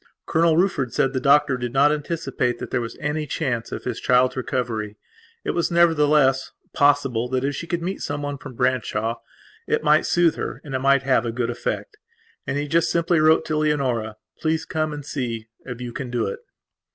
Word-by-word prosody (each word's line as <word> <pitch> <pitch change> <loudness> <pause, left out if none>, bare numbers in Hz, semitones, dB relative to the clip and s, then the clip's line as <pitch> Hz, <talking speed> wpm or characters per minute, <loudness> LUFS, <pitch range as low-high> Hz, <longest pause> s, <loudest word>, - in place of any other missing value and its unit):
Colonel 165 0 +3
Rufford 155 -9 +1
said 135 +1 +2
the 130 - 0
doctor 140 -1 +4
did 120 -1 -4
not 140 +2 +5
anticipate 145 -5 -2
that - - -7
there 125 - 0
was 115 -1 -6
any 150 +1 -2
chance 125 -6 -2
of - - -5
his 125 -2 -3
child's 125 0 +3
recovery. 115 -5 -3 0.5
It - - -1
was, 170 - 0
nevertheless, 150 -6 +3 0.2
possible 135 -5 +2
that 130 0 -1
if 140 +1 0
she 170 - -6
could 170 0 -2
see 190 +3 -3
someone 145 -1 -4
from 130 - -10
Branshaw 120 -3 0 0.5
it - - 0
might 150 +1 +4
soothe 175 -2 +3
her - - -4
and 145 -4 -8
it 130 - 0
might 140 +1 +3
have 130 -3 +2
a 120 - -2
good 120 0 -1
effect. 275 - -4 0.5
And 135 - -1
he 145 0 -2
just 165 +3 +2
simply 170 0 +2
wrote 155 +1 +4
to 155 - -1
Leonora: 130 -8 0 0.2
"Please 160 0 0
come 155 -1 -1
and 145 -1 -7
see 115 -6 -4 0.2
if 125 -2 -6
you 120 -1 -6
can 130 -1 -5
do 120 -2 -1
it." 100 - -4
140 Hz, 200 wpm, -23 LUFS, 125-155 Hz, 0.5 s, not